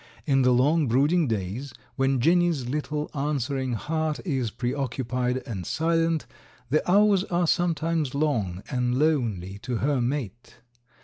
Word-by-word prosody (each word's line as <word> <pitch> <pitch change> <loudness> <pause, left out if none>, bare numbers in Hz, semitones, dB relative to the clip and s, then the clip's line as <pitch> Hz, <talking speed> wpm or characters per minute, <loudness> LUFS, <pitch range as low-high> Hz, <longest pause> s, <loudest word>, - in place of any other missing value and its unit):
In 135 -2 +3
the 125 0 +4
long 145 +5 +3
brooding 145 +7 +3
days, 115 +5 -3 0.2
when 135 -1 +1
Jenny's 170 -2 +2
little 150 +2 -3
answering 135 -3 -1
heart 155 +5 -2
is 135 -9 -1
preoccupied 125 0 -2
and 105 -8 -5
silent, 165 - 0 0.5
the 155 - +3
hours 200 -1 +5
are 175 -2 0
sometimes 165 -4 0
long 110 - -1
and 125 -1 0
lonely 115 - 0
to 125 +3 -4
her 135 +2 +1
mate. 120 -3 -4
135 Hz, 130 wpm, -26 LUFS, 125-155 Hz, 0.5 s, hours